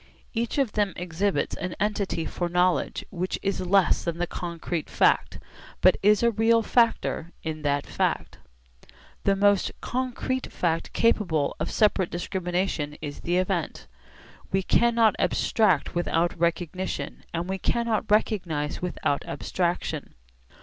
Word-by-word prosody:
Each 235 +3 -2
of 270 -6 +2
them 205 -3 0
exhibits 180 +3 -1
an 180 -1 -4
entity 200 -5 -1
for 175 -1 -3
knowledge 180 +1 +1
which 185 0 -2
is 195 -1 -1
less 185 0 +3
than 170 -1 -2
the 175 - 0
concrete 170 -2 -4
fact, - - +2 0.4
but 185 - +6
is 210 +2 +4
a 235 - +4
real 225 +1 +3
factor 225 -8 +1
in 155 -1 -4
that 145 -1 0
fact. - - -2 0.9
The 200 - +4
most 205 -1 +3
concrete 255 +1 -2
fact 165 -2 -1
capable 175 -10 +2
of - - -2
separate 205 -4 +2
discrimination 175 -4 -2
is 145 -2 -6
the 175 +1 0
event. 185 -3 -1 0.7
We 190 0 +1
cannot 230 +1 +4
abstract 195 -10 +2
without 170 0 0
recognition, 170 +2 -2
and 170 +1 -3
we 190 0 -3
cannot 230 -1 0
recognise 175 -8 0
without 175 -5 -1
abstraction. 175 -1 -2
185 Hz, 130 wpm, -26 LUFS, 170-210 Hz, 0.9 s, but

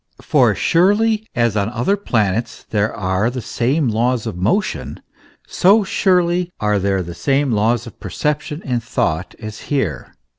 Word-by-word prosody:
For - - +3
as - - -9
surely 210 +5 +2
as 120 -3 +1
on 100 -1 +1
the 120 - -7
other 125 +13 +2
planets 115 - -1
there 105 0 +1
are 95 +1 0
the 125 +1 -5
same 130 +5 0
laws 120 +1 0
of 110 -6 -4
motion, 105 - -1 0.5
so 205 +4 +4
surely 180 -2 +1
are 105 -2 +1
there 95 -1 0
the 85 0 -7
same 140 +5 0
laws 110 +2 +1
of - - -12
percep 150 0 -1
tion 150 +2 -7
and 120 -3 -1
thought 90 -7 -2
as 110 -1 -7
here. 105 - -2
120 Hz, 170 wpm, -19 LUFS, 105-165 Hz, 0.5 s, so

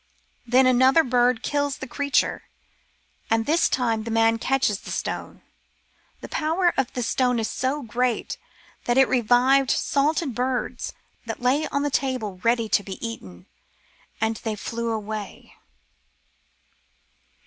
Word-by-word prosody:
Then 255 +2 +5
another 260 +5 +5
bird 245 -2 +2
kills 285 -1 -1
the - - -6
creature, 280 +1 0 0.8
and 225 0 +2
this 325 +3 +2
time 230 -4 0
the 230 - -6
man 225 0 +3
catches 250 -6 +1
the - - -11
stone. - - -5 0.8
The - - -7
power 335 +3 +1
of 265 -1 0
the 245 - -2
stone 250 +1 +1
was 225 -1 -1
so 275 +3 -2
great 245 +1 -1 0.5
that 240 +1 +1
it 265 -1 +6
revived 255 +2 +3
salted 290 0 +1
birds 250 +1 -2 0.3
that 225 - -4
lay 265 +5 +1
on 280 - -1
the 290 - -1
table 250 -9 -2
ready 230 -1 +2
to 210 - +2
be 195 -1 -7
eaten, 95 - -10 0.7
and 220 0 0
they 220 -2 -4
flew 230 +2 -4
away. 215 -2 -5
245 Hz, 135 wpm, -24 LUFS, 225-270 Hz, 0.8 s, it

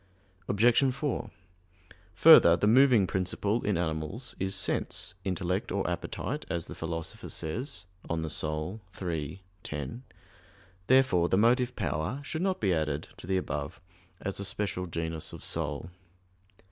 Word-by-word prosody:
Obj. 120 +6 +4
4: 135 -4 -2 0.9
Further, 90 - +8
the 95 - +1
moving 120 -2 +6
principle 100 +5 -1
in 105 -3 +1
animals 80 - -3
is 95 +1 -1
sense, 90 -2 -1
intellect 90 0 -1
or - - 0
appetite, - - -3
as 85 -1 -2
the - - -8
Philosopher 80 0 -5
says 95 - -3 0.2
(De - - -6
Anima 80 +3 -2 0.3
iii, 80 +4 -4 0.2
10). 75 - -5 0.8
Therefore 130 -10 +4
the 95 - +3
motive 125 +3 +3
power 85 - -2
should 160 +3 -4
not 190 0 0
be 95 -4 +2
added 75 -2 -1
to - - -11
the 95 0 +2
above 75 -3 -3 0.4
as 100 0 -4
a - - -2
special 95 -2 -2
genus 80 -1 -3
of - - -9
soul. 75 +1 -2
95 Hz, 135 wpm, -29 LUFS, 80-115 Hz, 0.9 s, Further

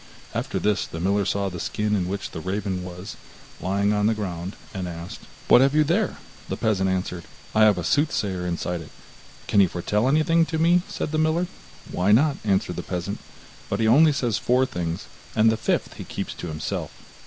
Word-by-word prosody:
After - - -2
this 105 -1 +1
the 80 - -7
miller 100 +3 +1
saw 100 +1 0
the 90 -2 -5
skin 105 +4 -1
in 90 -3 0
which 100 +1 -4
the - - -5
raven 95 +1 -2
was, 90 +2 -8 0.4
lying 100 +3 +1
on 105 0 +2
the 110 - +2
ground, 90 -2 -4 0.2
and 95 -3 -3
asked: 85 0 -7 0.3
'What 125 - +7
have 135 +2 +3
you 155 - +6
there?' 175 +7 +1 0.3
The - - -2
peasant 95 -3 +1
answered: 90 -2 -2 0.3
'I 110 - +5
have 105 -3 +5
a 90 - -2
soothsayer 100 - 0
inside 85 0 -2
it.' 80 - -11 0.6
'Can 100 - +3
he 95 - +7
foretell 105 +7 0
anything 155 +4 +4
to 160 - -2
me?' 170 +2 +4
said - - -4
the 155 - 0
miller. 160 +3 +2 0.5
'Why 95 +3 +2
not?' 140 +6 +4
answered 100 -3 0
the - - -2
peasant: 90 +3 -4 0.5
'but - - -1
he 110 - +2
only 150 +7 +6
says 120 -7 0
four 125 +4 +3
things, 85 -4 -4 0.3
and 110 0 +5
the - - +1
fifth - - -1
he - - -8
keeps - - -5
to - - -7
himself. 75 -1 -3
100 Hz, 200 wpm, -24 LUFS, 90-125 Hz, 0.6 s, What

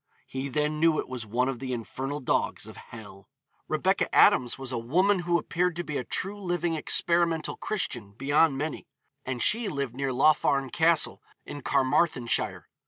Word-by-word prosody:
'He 135 +1 -5
then 150 +3 -1
knew 160 -1 +3
it - - -2
was 125 -4 -6
one 125 +4 0
of 135 -3 -3
the 130 -1 -4
infernal 135 +4 -4
dogs 130 - -1
of - - -11
hell.' 100 -4 -12 0.4
Rebecca - - +1
Adams 125 -2 +5
was 135 -1 -6
'a 125 - -2
woman 185 - +2
who 175 0 +1
appeared 175 +1 -1
to 175 - -3
be 150 - -5
a 130 - -1
true 200 - -4
living 175 -2 -1
experimental 170 +1 +1
Christian, 120 - -3
beyond 140 +4 +2
many,' 155 +2 -4 0.4
and 125 -2 -2
she 225 -1 +2
lived 140 -7 -3
near 135 +1 -2
Laugharne 140 -1 +2
Castle, 165 +2 +2 0.2
in 145 0 -7
Carmarthenshire. 130 -3 +1
145 Hz, 170 wpm, -27 LUFS, 125-170 Hz, 0.4 s, Adams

